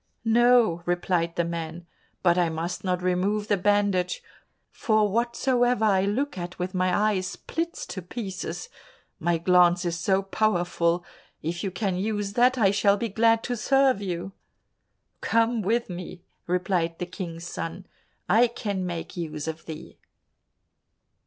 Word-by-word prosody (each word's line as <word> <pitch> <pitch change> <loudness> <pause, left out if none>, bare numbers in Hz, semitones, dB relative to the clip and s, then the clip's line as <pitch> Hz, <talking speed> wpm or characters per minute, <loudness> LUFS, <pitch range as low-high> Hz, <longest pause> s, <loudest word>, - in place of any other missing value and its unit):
"No," 235 -6 +4
replied 175 -1 0
the 170 - +1
man, 170 0 -5 0.4
"but 175 -2 +5
I 175 -2 +2
must 165 +2 -4
not 180 -1 -1
remove 195 +4 0
the 205 - +4
bandage, 200 -2 +1 0.5
for 215 -2 +2
whatsoever 240 +2 +1
I 195 -2 +3
look 240 +2 -1
at 175 +1 -6
with 180 +1 -3
my 185 +3 +2
eyes, 185 -2 -1
splits 330 - -4
to 185 - -6
pieces, 195 - -5 0.5
my 170 +1 +1
glance 180 +1 +4
is 170 -1 -1
so 190 +2 +1
powerful. 175 -4 +1 0.4
If 170 +3 -3
you 195 - -1
can 190 0 -2
use 205 0 -2
that, 250 +3 +4
I 200 -5 +4
shall 200 0 +3
be 230 +2 -2
glad 225 +2 +3
to 245 - -2
serve 270 -1 +3
you." 180 -1 -4 0.9
"Come 230 0 +2
with 230 +4 0
me," 180 0 -8 0.2
replied 175 -2 0
the 180 - -3
King's 175 -2 -7
son, 175 +1 -5 0.4
"I 225 +6 +5
can 205 -5 -3
make 170 -2 -5
use 155 -3 -4
of 160 0 -6
thee." 160 -1 -9
190 Hz, 145 wpm, -26 LUFS, 175-215 Hz, 0.9 s, but